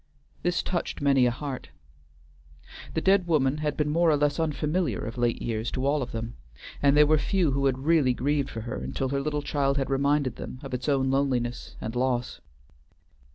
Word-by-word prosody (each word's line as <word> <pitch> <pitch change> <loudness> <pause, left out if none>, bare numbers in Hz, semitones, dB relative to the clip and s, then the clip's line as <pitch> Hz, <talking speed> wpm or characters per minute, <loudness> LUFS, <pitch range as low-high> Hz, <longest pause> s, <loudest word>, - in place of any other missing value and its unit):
This 175 -1 0
touched 175 -2 -3
many 135 -3 +4
a - - +4
heart. 130 +1 -5 1.3
The - - +1
dead 190 -2 +3
woman 145 -4 +2
had 150 -1 -2
been 150 -1 0
more 170 +2 +3
or 150 - +4
less 145 +1 +1
unfamiliar 155 - 0
of 115 - -5
late 120 -1 0
years 115 0 -2
to 130 0 -1
all 145 +1 +2
of 125 - -4
them; 115 +1 -5 0.4
and 140 0 +4
there 150 - +8
were 155 +1 +3
few 175 -2 +1
who 140 +1 +1
had 130 -1 +1
really 150 -6 +3
grieved 145 +2 0
for 115 - -6
her 120 +3 -5
until 135 - -3
her 140 +1 -1
little 150 0 -2
child 140 -1 0
had 135 0 -1
reminded 140 -2 +1
them 130 - -7
of 135 - -7
its 125 +4 -2
own 135 -2 +2
loneliness 130 -3 -1
and 110 +2 -5
loss. 125 -1 -1
140 Hz, 200 wpm, -27 LUFS, 125-150 Hz, 1.3 s, there